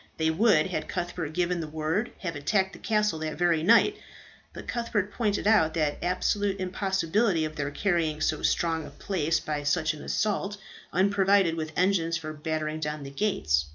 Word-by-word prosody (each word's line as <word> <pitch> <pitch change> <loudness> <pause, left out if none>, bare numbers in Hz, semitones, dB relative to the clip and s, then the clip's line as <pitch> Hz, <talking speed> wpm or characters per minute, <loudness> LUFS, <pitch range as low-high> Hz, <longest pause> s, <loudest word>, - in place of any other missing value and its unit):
They 160 0 +2
would, 165 -3 +4
had 155 - -3
Cuthbert 175 -3 -3
given 180 +1 0
the 160 - -4
word, 160 +9 -2
have 170 -5 -3
attacked 190 +7 0
the - - -11
castle 210 -6 +1
that 155 -1 -4
very 170 -2 +2
night. 230 - +5 0.5
But - - -10
Cuthbert 225 -4 -1
pointed 210 -4 0
out 185 -8 +4
the 150 -3 -1
absolute 195 +2 0
impossibility 190 -1 +1
of 155 0 -6
their 145 -1 -2
carrying 160 -2 0
so 155 0 0
strong 165 -2 0
a - - -9
place 165 -4 -1
by 150 -2 -3
such 155 +2 +1
an 155 - -10
assault, 205 -1 -1 0.3
unprovided 195 -1 +3
with 160 -1 -4
engines 175 -3 +2
for 155 -2 -6
battering 155 0 -3
down 150 -1 -3
the 140 - -8
gates. 140 - +1
170 Hz, 175 wpm, -27 LUFS, 155-200 Hz, 0.5 s, night